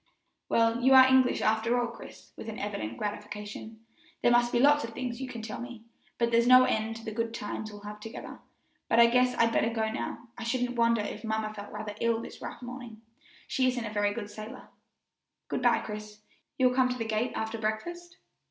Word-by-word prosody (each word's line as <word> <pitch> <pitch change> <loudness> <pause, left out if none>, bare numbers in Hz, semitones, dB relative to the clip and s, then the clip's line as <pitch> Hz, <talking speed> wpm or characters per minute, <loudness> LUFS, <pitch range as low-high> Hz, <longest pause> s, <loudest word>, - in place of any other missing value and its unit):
"Well, 230 +1 +3
you 265 +2 +6
are 260 0 +10
English, 260 -1 +4
after 220 +3 +2
all, 240 - +1
Chris," 235 - -12
with 225 - -7
evident 205 - -4
gratification; 210 +2 -6 0.4
"there 240 - +5
must 240 0 +4
be - - +2
lots 290 +3 +5
of 230 - -4
more - - -12
things 250 -1 -4
you 265 - -3
can 235 -3 -7
tell 220 0 -5
me, 240 -2 -8 0.4
and 235 0 +2
there's 235 +1 +4
no 255 0 +9
end 220 -2 0
to 225 0 -10
the 220 - -4
good 230 +1 -2
times 215 0 -5
we'll 205 0 -11
have 210 0 -8
together; 225 +2 -8 0.5
but 230 - +4
I 235 - +9
guess 250 +1 +3
I'd 230 0 +3
better 225 - +2
go 220 -1 -1
now. 235 +1 -5
I - - -5
shouldn't 245 +1 -1
wonder 230 -1 +3
if 210 0 -5
mamma 220 -1 -2
felt 205 -1 -9
rather 210 -1 -5
ill 230 -1 +2
this 230 - -9
rough - - -7
morning 245 -3 -9 0.4
she 260 -1 +1
isn't 245 -2 -1
a 210 - -5
very 205 -1 +2
good 205 -1 -6
sailor. 215 +5 -9 0.8
Good - - -2
by, - - +4
Chris; 210 0 -7 0.4
you'll 255 -1 +4
come 255 0 +3
to 250 - -2
the 225 - -3
gate 220 +3 -1
after 220 +1 -3
breakfast?" 345 +12 -4
230 Hz, 215 wpm, -29 LUFS, 215-245 Hz, 0.8 s, are